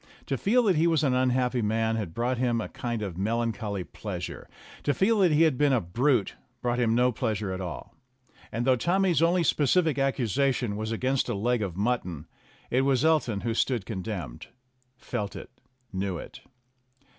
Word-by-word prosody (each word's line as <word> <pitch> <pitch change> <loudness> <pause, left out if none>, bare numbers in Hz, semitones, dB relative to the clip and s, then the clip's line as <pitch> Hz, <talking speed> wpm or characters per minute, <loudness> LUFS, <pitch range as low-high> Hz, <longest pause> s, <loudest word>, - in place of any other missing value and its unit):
To 135 - -1
feel 230 - +2
that 190 -7 +3
he 165 +2 +4
was 160 -3 +2
an 135 -3 +2
unhappy 125 -1 +1
man 110 +1 +1
had 100 -7 -4
brought 120 +1 0
him 120 -2 +1
a - - -4
kind 120 -3 -4
of 95 -3 -5
melancholy 110 -2 -1
pleasure; - - -7 0.3
to 145 - 0
feel 215 +3 +3
that 185 -4 +4
he 155 +2 +5
had 155 -6 +2
been 145 -2 +4
a 125 - +4
brute 115 - +1 0.3
brought 120 0 -1
him 115 -2 +2
no 125 +1 +3
pleasure 110 -5 -2
at 95 - -4
all. 85 -4 -6 0.6
And, 115 +3 -2
though 130 -1 +5
Tommy's 175 +3 +2
only 170 +1 +3
specific 155 0 +2
accusation 130 -3 0
was 110 +1 -3
against 130 +4 0
the 120 - -1
leg 120 +3 0
of 95 -4 -3
mutton, 100 -8 -1 0.5
it 125 - +3
was 135 +1 +2
Elton 145 -11 +2
who 115 -1 -1
stood 120 -3 0
condemned 95 - -5 0.5
felt 100 -4 -4
it - - -9 0.4
knew 95 -1 -2
it. - - -10
120 Hz, 180 wpm, -27 LUFS, 105-140 Hz, 0.6 s, he